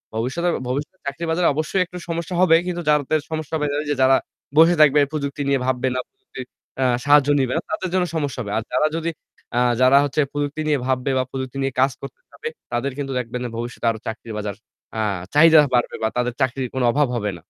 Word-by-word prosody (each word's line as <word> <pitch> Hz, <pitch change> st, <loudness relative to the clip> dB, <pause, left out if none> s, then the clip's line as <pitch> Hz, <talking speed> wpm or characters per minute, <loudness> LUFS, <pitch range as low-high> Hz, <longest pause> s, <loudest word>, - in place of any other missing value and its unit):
ভবিষ্যতে 135 Hz, +10 st, -1 dB, 0.2 s
ভবিষ্যতে 145 Hz, +8 st, -3 dB
চাকরি 140 Hz, +4 st, -4 dB
বাজারে 170 Hz, +1 st, +2 dB
অবশ্যই 155 Hz, +5 st, 0 dB
একটু 180 Hz, +1 st, -10 dB
সমস্যা 170 Hz, +2 st, -3 dB
হবে 170 Hz, -3 st, +6 dB
কিন্তু 175 Hz, -1 st, -2 dB
যাদের 150 Hz, +1 st, +2 dB
সমস্যা 155 Hz, -1 st, -4 dB
হবে, 150 Hz, -, -1 dB, 0.2 s
ওইযে 145 Hz, -1 st, -2 dB
যারা 130 Hz, 0 st, +5 dB, 0.4 s
বসে 165 Hz, +2 st, +7 dB
থাকবে 150 Hz, -1 st, +6 dB
প্রযুক্তি 145 Hz, -1 st, -3 dB
নিয়ে 140 Hz, -1 st, +2 dB
ভাববে 130 Hz, 0 st, 0 dB
না, 125 Hz, -, 0 dB
প্রযুক্তির 130 Hz, -, -11 dB, 0.4 s
আ -, -, +3 dB, 0.2 s
সাহায্য 145 Hz, -1 st, +5 dB
নিবে 130 Hz, -2 st, 0 dB
না, 165 Hz, -, 0 dB
তাদের 190 Hz, -3 st, -2 dB
জন্য 185 Hz, -1 st, +2 dB
সমস্যা 140 Hz, -4 st, -2 dB
হবে। 100 Hz, -3 st, -5 dB
আর 110 Hz, -, -1 dB
যারা 140 Hz, +5 st, +2 dB
যদি 165 Hz, 0 st, -1 dB, 0.5 s
আ -, -, +4 dB, 0.2 s
যারা 130 Hz, +2 st, +6 dB
হচ্ছে 145 Hz, +1 st, 0 dB
প্রযুক্তি 145 Hz, +1 st, -2 dB
নিয়ে 150 Hz, -2 st, +2 dB
ভাববে 130 Hz, +1 st, 0 dB
বা 130 Hz, -, +2 dB
প্রযুক্তি 130 Hz, 0 st, -5 dB
নিয়ে 135 Hz, -1 st, -1 dB
কাজ 135 Hz, -, +4 dB
করতে 485 Hz, -, -9 dB
পারবে, -, -, -8 dB, 0.2 s
তাদের 120 Hz, +4 st, -1 dB
কিন্তু 140 Hz, -2 st, -4 dB
দেখবেন 125 Hz, 0 st, -4 dB
যে 120 Hz, -, -3 dB
ভবিষ্যতে 120 Hz, 0 st, -5 dB
আরো 110 Hz, -, -7 dB
চাকরি 115 Hz, +1 st, -6 dB
বাজার 105 Hz, -1 st, -4 dB, 0.4 s
আ -, -, -1 dB, 0.3 s
চাহিদা 160 Hz, +1 st, +7 dB
বাড়বে 120 Hz, -1 st, +1 dB
বা 110 Hz, -, +2 dB
তাদের 125 Hz, 0 st, 0 dB
চাকরির 130 Hz, 0 st, 0 dB
কোনো 130 Hz, -2 st, +1 dB
অভাব 145 Hz, +2 st, +2 dB
হবে 105 Hz, -3 st, -1 dB
না। -, -, -14 dB
140 Hz, 215 wpm, -22 LUFS, 125-155 Hz, 0.5 s, বসে